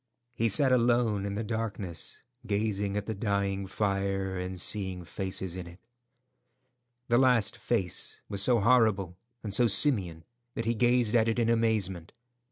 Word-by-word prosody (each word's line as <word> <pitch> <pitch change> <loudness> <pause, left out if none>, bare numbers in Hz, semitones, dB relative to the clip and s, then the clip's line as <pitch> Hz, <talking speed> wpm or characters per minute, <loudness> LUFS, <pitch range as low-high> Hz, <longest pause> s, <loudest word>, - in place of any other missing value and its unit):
He 115 -1 0
sat 130 +6 +4
alone 120 -4 +2
in 100 - -4
the 110 - -3
darkness, 105 -6 -4 0.3
gazing 100 -1 -1
at 105 - -3
the 110 - -3
dying 100 -2 -2
fire, 95 -1 -2
and 90 0 -5
seeing 95 -2 -1
faces 95 0 -4
in 90 -2 -7
it. 85 +2 -14 1.3
The 120 +1 +4
last 125 -5 +3
face 90 -3 -3
was 100 -1 +1
so 120 +1 +4
horrible 105 -6 +2 0.2
and 105 -3 -3
so 120 +2 +5
simian 95 - +3 0.3
that 115 - -3
he 115 - +1
gazed 120 -1 +2
at 115 -1 +3
it 115 - -1
in 115 -1 +1
amazement. 105 -7 -1
100 Hz, 155 wpm, -28 LUFS, 95-115 Hz, 1.3 s, so